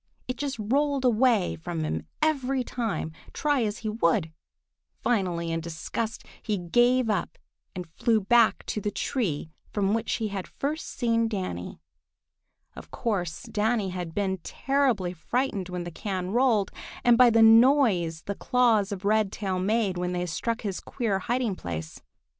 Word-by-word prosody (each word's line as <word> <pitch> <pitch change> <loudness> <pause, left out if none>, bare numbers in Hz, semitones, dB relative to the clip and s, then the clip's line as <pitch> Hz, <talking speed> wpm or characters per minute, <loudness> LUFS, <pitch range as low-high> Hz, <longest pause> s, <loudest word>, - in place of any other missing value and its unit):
It 255 - -2
just 280 -1 -3
rolled 275 +5 +1
away 235 -4 +3
from 160 0 -4
him 155 - -3 0.2
every 270 -4 +1
time, 230 -9 -3 0.2
try 290 -3 +1
as 210 -1 -2
he - - 0
would. 170 -5 +1 0.7
Finally, 180 -7 0
in 165 0 -1
disgust, 170 +7 -4 0.2
he 210 -2 -1
gave 240 +8 +3
up 205 -5 -1 0.4
and 180 -1 -5
flew 220 +7 +1
back 225 +3 +3
to 210 - -3
the 210 - -1
tree 180 - -2 0.2
from 200 -1 +1
which 225 0 -1
he 220 -2 -1
had 195 -2 -5
first 300 +3 -4
seen 230 -2 +1
Danny. 185 - -4 1.0
Of - - -11
course 180 -8 -2
Danny 215 -1 0
had 180 -3 -5
been 190 -2 0
terribly 250 -5 0
frightened 200 +2 -2
when 180 -1 -4
the 175 - -6
can 185 0 -4
rolled, 230 -4 +2 0.3
and 240 -1 +6
by 250 0 +7
the 225 -1 +5
noise 225 - +5
the 200 - -3
claws 225 -3 +2
of 200 0 -5
Redtail 205 -2 +1
made 200 -1 +1
when 180 0 -1
they 180 0 -1
struck 230 +7 -2
his 200 -4 -3
queer 220 -7 -2
hiding 240 -1 -1
place. 80 - -6
210 Hz, 155 wpm, -27 LUFS, 180-240 Hz, 1.0 s, by